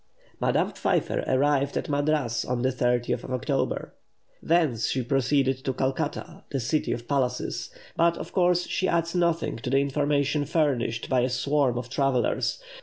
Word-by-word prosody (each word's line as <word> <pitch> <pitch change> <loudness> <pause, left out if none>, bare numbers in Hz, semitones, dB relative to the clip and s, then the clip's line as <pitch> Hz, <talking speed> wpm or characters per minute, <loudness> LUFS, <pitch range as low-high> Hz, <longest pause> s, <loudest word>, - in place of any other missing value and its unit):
Madame - - +1
Pfeiffer - - 0
arrived 140 +1 +2
at - - -2
Madras 145 -5 0
on 125 -1 -2
the 130 - +2
30th 120 -1 0
of - - -8
October. 125 -1 -1 0.5
Thence 155 -10 +2
she 130 - -1
proceeded 135 +1 +1
to 130 - -1
Calcutta, 130 +1 -3
the 135 - -2
city 150 +6 0
of 120 0 -4
palaces; 130 -3 -1 0.3
but, 170 0 +3
of - - -7
course, 180 -1 +3
she 185 - -1
adds 170 0 0
nothing 170 -2 0
to 125 +2 -5
the 135 - +3
information 140 +1 +1
furnished 130 -7 0
by 130 - +2
a 125 - +1
swarm 130 0 +1
of 120 0 -4
travellers. 135 - 0
135 Hz, 160 wpm, -26 LUFS, 125-150 Hz, 0.5 s, but